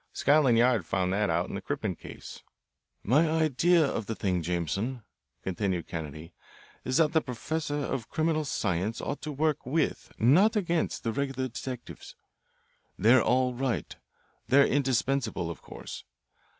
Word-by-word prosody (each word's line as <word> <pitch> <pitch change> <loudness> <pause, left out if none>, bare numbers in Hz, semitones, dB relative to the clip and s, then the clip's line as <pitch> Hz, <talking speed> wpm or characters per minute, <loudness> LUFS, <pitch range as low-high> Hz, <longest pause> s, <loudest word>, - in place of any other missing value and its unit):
Scotland 140 -5 +4
Yard 120 -4 +4
found 90 +2 -1
that 105 -1 +1
out 85 +2 +1
in - - -8
the 100 - -4
Crippen 105 -5 -3
case." - - -10 0.6
"My 150 +9 +3
idea 160 +2 +3
of 110 -6 -3
the 115 - -3
thing, 90 -4 0
Jameson," 90 - -2 0.4
continued 95 -2 -2
Kennedy, 80 0 -7 0.5
"is 130 - 0
that 160 -1 +3
the 160 - +4
professor 145 +4 -3
of 135 -5 -3
criminal 160 -1 0
science 105 - -1
ought - - -4
to 155 - -4
work 150 +1 0
with, 150 +5 -1
not 175 - +5
against, 175 -5 0
the 115 - -1
regular 135 0 -2
detectives. 125 +1 -8 0.8
They're 115 +5 +5
all 125 +1 +2
right. 130 -1 -2 0.5
They're 140 +3 +6
indispensable, 135 -8 0
of - - -10
course. - - -9
125 Hz, 145 wpm, -28 LUFS, 100-150 Hz, 0.8 s, They're